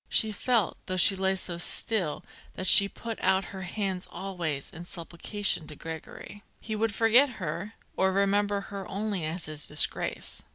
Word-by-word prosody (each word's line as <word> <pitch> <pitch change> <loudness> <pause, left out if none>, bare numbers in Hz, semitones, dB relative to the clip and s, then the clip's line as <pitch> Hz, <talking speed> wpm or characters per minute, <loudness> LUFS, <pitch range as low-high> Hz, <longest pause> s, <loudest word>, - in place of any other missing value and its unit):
She 220 - +3
felt, 225 -1 +1
though 185 - -2
she 195 +2 +6
lay 190 0 +1
so 175 -2 -3
still, 180 -4 +1 0.3
that 185 - -4
she 200 +1 +7
put 230 +1 -6
out 190 0 +3
her 190 - -6
hands 190 0 -3
always, 175 -6 -3
in 170 - -8
supplication, 175 0 -2
to 150 - -8
Gregory. 160 +6 -8 0.2
He 220 - -4
would 215 -1 0
forget 240 +4 +5
her, 180 +5 -4 0.2
or 190 0 +3
remember 200 +1 +2
her 195 -2 -5
only 200 -2 -2
as 165 +2 -3
his 155 -1 -2
disgrace. 150 - -1
190 Hz, 165 wpm, -28 LUFS, 170-205 Hz, 0.3 s, she